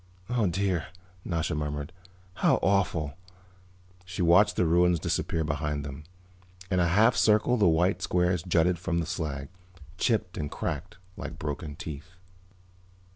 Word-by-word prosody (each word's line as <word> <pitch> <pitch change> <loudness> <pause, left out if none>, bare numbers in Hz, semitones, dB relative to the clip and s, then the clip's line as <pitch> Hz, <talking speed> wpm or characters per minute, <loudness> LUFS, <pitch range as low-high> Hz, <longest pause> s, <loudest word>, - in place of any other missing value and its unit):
"Oh, 120 -5 +2
dear," 90 -2 0 0.4
Nasha 85 -1 -1
murmured. 75 0 -3 0.4
"How - - +4
awful." 90 -7 +1 0.9
She 90 0 -3
watched 85 +5 +5
the 90 - +2
ruins 85 +1 +3
disappear 80 +2 -1
behind 75 -1 -2
them. 70 +2 -8 0.7
In 90 - +2
a 85 - +3
half 110 +8 +4
circle 110 +3 +3
the 105 -6 +3
white 90 +4 +2
squares 90 -1 +1
jutted 85 0 +2
from 85 -1 -1
the 85 - 0
slag, 75 -5 -4 0.5
chipped 110 -6 0
and 75 -1 -3
cracked, 80 +7 -4 0.2
like 75 +3 -6
broken 75 0 -5
teeth. 75 +4 -8
85 Hz, 135 wpm, -28 LUFS, 75-90 Hz, 0.9 s, watched